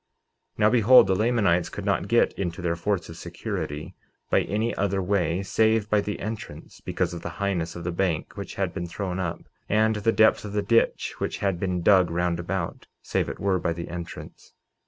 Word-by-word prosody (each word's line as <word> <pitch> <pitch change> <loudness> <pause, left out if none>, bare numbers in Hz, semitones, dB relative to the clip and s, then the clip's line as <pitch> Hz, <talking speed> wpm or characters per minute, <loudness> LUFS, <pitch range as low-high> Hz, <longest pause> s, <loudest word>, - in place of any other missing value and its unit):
49:18 - - -18
Now 105 - +5
behold, 125 +1 +7
the 95 - +1
Lamanites 100 -6 +2
could - - -7
not - - 0
get - - +3
into 85 -3 -4
their 85 -1 0
forts 90 +1 -1
of 80 - -10
security 75 -2 -5 0.4
by - - +4
any 110 +4 -1
other 100 0 0
way 95 -1 0
save 110 +1 +2
by 105 -1 +4
the 105 0 -4
entrance, 110 +1 -7
because 90 -2 -1
of 85 - -6
the - - -5
highness 95 -5 -1
of 85 - -7
the 90 - -2
bank 85 -2 -1
which 100 -1 -7
had 95 -3 -1
been 85 -2 -4
thrown 95 +1 -4
up, 85 -3 -3 0.3
and 110 +1 +3
the 110 +2 +2
depth 110 0 +4
of 105 -1 -7
the 105 -1 0
ditch 115 +3 +2
which - - -2
had 95 -3 -1
been 90 -2 -1
dug 95 -2 +5
round 85 0 0
about, 85 0 -4 0.2
save - - -1
it - - -7
were 95 -2 +1
by 85 -1 -1
the 85 0 -6
entrance. 85 -1 -9
95 Hz, 205 wpm, -25 LUFS, 85-105 Hz, 0.4 s, behold